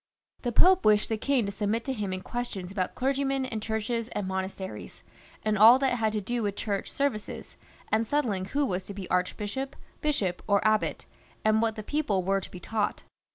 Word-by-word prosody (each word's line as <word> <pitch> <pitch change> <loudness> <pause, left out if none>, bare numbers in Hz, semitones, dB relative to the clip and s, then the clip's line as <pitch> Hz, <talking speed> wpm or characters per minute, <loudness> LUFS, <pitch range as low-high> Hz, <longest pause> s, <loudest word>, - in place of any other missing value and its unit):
The 245 - -1
Pope 370 +9 +5
wished 210 0 +4
the 225 - +1
king 265 -2 +2
to 200 - -2
submit 210 +3 -1
to 270 - -1
him 205 -5 -3
in 185 0 -3
questions 220 -7 -4
about 185 -2 -2
clergymen 270 0 0
and 225 -4 -4
churches 220 +1 -2
and 205 -2 -2
monasteries, 190 0 -5 0.4
and 215 -1 +1
all 230 +4 +10
that 265 -1 +1
had 220 -1 +2
to 210 - -1
do 240 +4 -2
with 205 -2 -1
Church 200 -2 -2
services, 275 -7 -2 0.4
and 220 +1 +2
settling 220 -10 0
who 285 +9 0
was 185 -5 -2
to 200 - -7
be 195 -3 -6
archbishop, 205 +9 -1 0.3
bishop, 205 -13 0
or 200 0 +3
abbot, 215 0 +1 0.4
and 215 0 +4
what 225 -1 +1
the 215 - -6
people 220 -8 0
were 195 +1 +1
to - - -7
be 180 - -9
taught. 210 +2 -2
215 Hz, 200 wpm, -28 LUFS, 195-245 Hz, 0.4 s, all